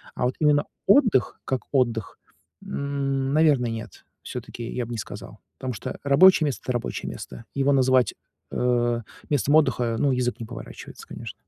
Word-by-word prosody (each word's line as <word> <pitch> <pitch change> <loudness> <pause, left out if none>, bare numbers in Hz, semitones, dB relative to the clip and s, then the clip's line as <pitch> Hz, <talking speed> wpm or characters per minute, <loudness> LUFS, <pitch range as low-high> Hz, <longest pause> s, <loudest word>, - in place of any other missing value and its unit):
А - - -2
вот 125 - 0
именно 150 -1 +3 0.2
отдых, 210 - +4
как 130 -1 -1
отдых, 120 -6 0 0.4
м, 135 -1 -2
наверное, 145 -6 +3
нет, 115 -1 -8 0.2
всё-таки 120 - -7
я 120 +1 -3
б 120 - -9
не 120 - -3
сказал, - - -8 0.2
потому 130 -1 -4
что 105 - -6
рабочее 155 +4 +6
место- 140 -4 -2
это 125 - -1
рабочее 120 - -3
место. 115 - -9
Его 140 0 +2
называть, 130 -2 +3 0.4
э, 120 -1 +1 0.3
местом 145 0 +2
отдыха 125 -6 +3
ну, 140 - +3
язык 125 -2 -1
не - - -4
поворачивается, 115 +1 -10
конечно. - - -8
130 Hz, 160 wpm, -25 LUFS, 120-140 Hz, 0.4 s, рабочее